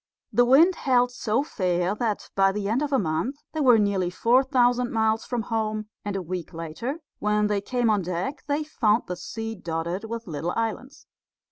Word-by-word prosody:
The 245 - +5
wind 320 +9 +5
held 250 -2 +2
so 245 +1 0
fair 180 - 0
that 215 -1 -3
by 195 0 +4
the 200 0 -3
end 230 +6 +1
of 295 -1 -2
a 270 - +4
month 185 - -1 0.2
they 315 - -3
were 250 -4 +6
nearly 200 -4 +1
four 235 +8 +3
thousand 245 -2 +2
miles 220 0 +1
from 240 -3 -2
home, 215 -2 -2
and 205 -1 -3
a 190 - -2
week 180 0 -5
later 165 - -5 0.2
when 210 0 +1
they 205 -1 0
came 245 +3 0
on 210 -2 +3
deck 185 - -3
they 290 +1 0
found 225 -7 +1
the 180 - -4
sea 225 +5 -5
dotted 170 +1 -4
with 230 +1 -5
little 165 +1 -3
islands. 230 +5 -4
220 Hz, 195 wpm, -25 LUFS, 190-245 Hz, 0.2 s, were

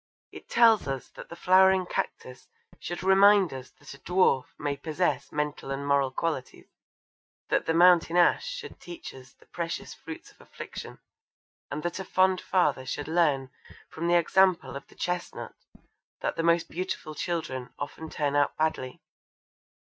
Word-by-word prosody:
It - - -12
tells 230 -6 +5
us 135 -2 -4
that - - -12
the - - -8
flowering 190 +1 +4
cactus 130 -6 -5 0.3
should 175 +1 -6
remind 195 -2 +5
us 130 -1 -8
that 145 - -12
a 140 - -14
dwarf 180 -8 +2
may 145 -1 -2
possess 160 +5 -2
mental 150 -2 -3
and 135 +1 -3
moral 140 -1 +2
qualities, 135 -1 -4 0.8
that - - +1
the 165 - +1
mountain 175 0 +5
ash 175 - +4
should - - -7
teach 175 -1 -9
us 130 0 -14
the - - -24
precious 170 -1 -5
fruits 160 0 -10
of - - -22
affliction, - - -9 0.7
and 150 +2 -5
that 175 +2 -3
a - - -3
fond 185 0 +2
father 180 -8 +1
should 145 +2 -4
learn 150 -6 +1 0.4
from 165 +2 -3
the 175 0 +5
example 175 -5 +2
of 140 - -8
the - - -20
chestnut 180 -1 -4 0.7
that - - -2
the - - -1
most 170 0 +2
beautiful 175 -3 -5
children 150 -7 -4
often 160 +2 -6
turn 145 -2 -1
out 145 0 +1
badly! 155 -5 -2
165 Hz, 160 wpm, -27 LUFS, 140-180 Hz, 0.8 s, tells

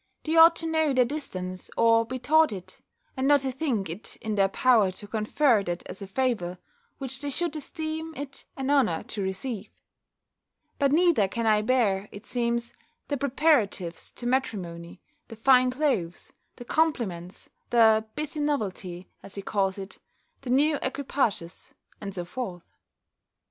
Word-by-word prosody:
They 320 +1 -1
ought 330 +1 +8
to 330 - -5
know 315 -3 +2
their 255 -1 +4
distance, 185 -10 -5
or 230 0 +4
be 255 +2 -4
taught 315 +4 +4
it, 185 -3 -9 0.3
and 265 0 0
not 290 -1 +5
to 265 -1 -2
think 255 - -1
it 165 +6 -7
in 220 - -4
their 195 -1 +3
power 220 -1 +4
to 185 +3 -6
confer 220 +3 +2
that 175 0 -4
as 195 - -8
a 195 - -6
favour, 195 -6 -1 0.4
which 265 0 -4
they 290 - -2
should 330 +3 -2
esteem 315 +1 -5
it 280 -1 -7
an 270 +1 -1
honour 240 - +2
to 215 -2 -5
receive. 195 +3 -4 1.1
But 280 -2 +3
neither 320 - +4
can 230 +4 -3
I 215 -1 +4
bear, 210 -4 +1
it 205 +2 -11
seems, 235 -1 -1 0.4
the 290 - 0
preparatives 245 - +1
to 240 - -8
matrimony, 185 -10 -2 0.3
the 225 - -9
fine 255 +2 +5
clothes, 250 - -1 0.2
the 245 - -10
compliments, 220 - -1 0.2
the 220 -2 +5
busy 305 +1 -3
novelty, 195 -11 -2
as 195 - -9
he 200 - -5
calls 195 -1 0
it, 195 0 -8 0.4
the 265 - -7
new 290 +3 +3
equipages, 255 -10 -2 0.3
and 200 -2 -6
so 175 -2 -4
forth. 180 -3 -6
235 Hz, 160 wpm, -27 LUFS, 195-280 Hz, 1.1 s, ought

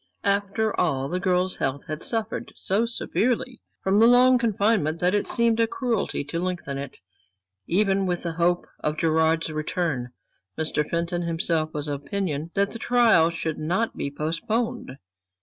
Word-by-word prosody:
After 200 +2 0
all, 135 0 0
the 180 - -1
girl's 185 0 0
health 135 +1 -2
had 155 0 -5
suffered 225 -1 -2
so 210 +5 0
severely 245 +1 -1 0.2
from 195 +2 +3
the 225 - +7
long 250 +1 +6
confinement 205 -8 +1
that 180 +2 +2
it 205 - +1
seemed 230 -1 +2
a 230 - +4
cruelty 230 - -1
to 145 +4 -4
lengthen 175 -6 -3
it, 140 -1 -7 0.7
even 195 +1 +2
with 175 -1 -1
the 170 - -2
hope 175 +1 +1
of 150 0 -2
Gerard's 160 0 +2
return. 155 -4 -2 0.5
Mr. 155 -1 0
Fenton 170 +1 -1
himself 165 -2 0
was 150 0 -3
of 145 -1 -3
opinion 160 -2 -3
that 200 0 +1
the 230 - -6
trial 230 -10 +4
should 165 -2 -4
not 180 +9 -1
be - - -3
postponed. 165 - -2
175 Hz, 160 wpm, -25 LUFS, 155-215 Hz, 0.7 s, the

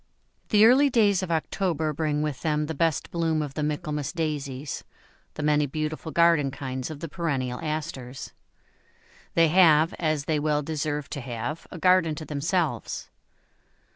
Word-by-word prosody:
The 210 0 +6
early 270 +5 +6
days 205 -6 +3
of 185 - -4
October 160 -1 -1
bring 150 0 -1
with 150 -4 -3
them 150 -2 0
the 160 - -4
best 160 0 0
bloom 165 -2 0
of 145 -2 -6
the 150 - -3
Michaelmas 150 -1 -2
Daisies, 145 -5 -3 0.5
the 155 - -4
many 150 -1 +3
beautiful 155 +3 -4
garden 170 -4 +4
kinds 130 -1 -5
of 155 -2 -8
the 165 - -4
perennial 135 -7 -2
Asters. 150 -5 -5 1.0
They 165 -1 +5
have, 165 -2 +5
as 155 -3 0
they 155 -2 +1
well 150 0 +1
deserve 150 -1 -2
to 140 - -4
have, 120 +5 -5
a - - -8
garden 180 -2 +3
to 155 - -7
themselves. 155 +3 -2
155 Hz, 155 wpm, -26 LUFS, 145-165 Hz, 1.0 s, The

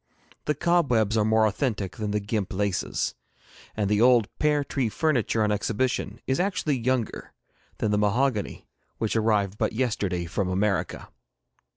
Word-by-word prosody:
The 150 - +1
cobwebs 130 - +2
are 110 - +3
more 110 +1 +3
authentic 105 -4 -1
than 105 -1 -3
the 105 +1 0
gimp 105 -1 -3
laces, 100 -1 -1 0.6
and 105 -2 +1
the 105 +1 +2
old 120 -3 +5
pear 150 -1 +2
tree 135 -4 -1
furniture 120 -5 +1
on 105 - +1
exhibition 110 +1 -1
is 130 - 0
actually 180 -7 0
younger 125 -1 -2 0.4
than 110 - 0
the 105 - +2
mahogany 105 +1 0 0.3
which 110 -1 -1
arrived 105 -3 +1
but - - 0
yesterday 105 -7 -1
from 90 +3 -2
America. 95 -1 -1
110 Hz, 150 wpm, -26 LUFS, 105-130 Hz, 0.6 s, old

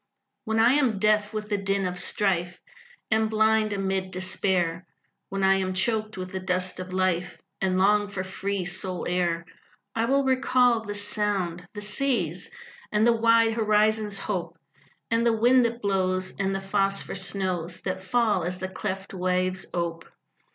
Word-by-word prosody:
When 220 -1 -1
I 235 +3 +5
am 260 -7 +2
deaf 210 +1 +2
with 215 -1 -5
the 205 -2 0
din 195 0 0
of 180 0 -3
strife, 180 -2 0 0.5
And 220 0 +2
blind 220 0 +2
amid 190 -1 -1
despair, 185 -2 0 0.4
When 195 0 -2
I 195 0 +5
am 185 -1 -2
choked 215 +1 -1
with 185 0 -5
the 190 - -3
dust 185 0 -1
of 185 0 -6
life 185 -2 -1 0.2
And 185 -1 +1
long 205 +2 +3
for 195 -2 -4
free 195 0 -3
soul 180 0 -3
air, 175 -2 0 0.5
I 225 0 0
will 275 +3 +2
recall 255 -3 +3
this 205 -1 -3
sound 190 -5 -1
the 205 - -5
sea's, 210 - -1 0.4
And 215 +1 +3
the 235 - +5
wide 230 0 +4
horizon's 215 -1 +2
hope, 195 -3 -4 0.5
And 230 0 +2
the 230 -1 +2
wind 245 +3 +5
that 235 0 -3
blows 185 -2 0
And 195 0 0
the 195 - -3
phosphor 195 0 0
snows 180 -3 -2
That 185 -1 -3
fall 210 -1 +1
as 180 +2 -3
the 185 0 -4
cleft 190 +1 -5
waves 185 0 -1
ope. 170 -1 -3
195 Hz, 165 wpm, -26 LUFS, 185-215 Hz, 0.5 s, I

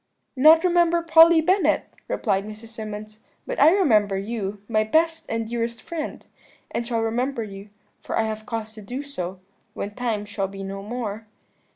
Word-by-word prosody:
"'Not 310 +5 +7
remember 345 -1 +3
Polly 330 0 +7
Bennet?' 370 +5 +1
replied 195 0 0
Mrs. 215 +2 -9
Symonds, 215 -1 -8 0.3
'but - - -4
I - - +9
remember 220 - +3
you, 205 0 -4
my 215 -2 +2
best 320 +7 +1
and 225 0 -2
dearest 235 0 -3
friend, 330 -3 -6 0.5
and 235 - -3
shall 230 -2 0
remember 235 +2 -1
you, 200 0 -9 0.3
for - - -3
I - - +3
have 215 0 -4
cause 220 -2 -4
to 220 - -10
do 245 +7 -5
so, 185 -10 -6 0.4
when 205 - -4
time 225 -3 -2
shall 205 -1 -3
be 195 0 -8
no 195 0 -5
more.' 220 0 -5
225 Hz, 170 wpm, -24 LUFS, 210-300 Hz, 0.5 s, I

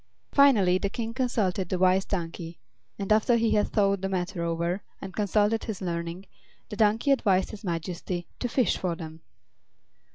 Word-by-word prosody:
Finally 210 -11 +5
the 200 - -1
King 230 +2 -4
consulted 210 -8 0
the 185 - 0
Wise 185 +1 +3
Donkey; 170 -2 -4 0.4
and 200 +1 +1
after 220 +3 +3
he 230 -1 +2
had 210 - +2
thought 200 -2 +1
the 195 - -2
matter 185 -1 -2
over 170 +3 -1 0.2
and 190 - -8
consulted 210 +1 +1
his 215 -4 -4
learning, 170 0 -4 0.4
the - - -6
donkey 220 +5 +2
advised 195 -8 +2
his 215 -1 -10
Majesty 175 0 -3
to 245 - -2
fish 255 +1 +2
for 180 -2 -1
them. 160 -1 -9
195 Hz, 165 wpm, -27 LUFS, 175-215 Hz, 0.4 s, Finally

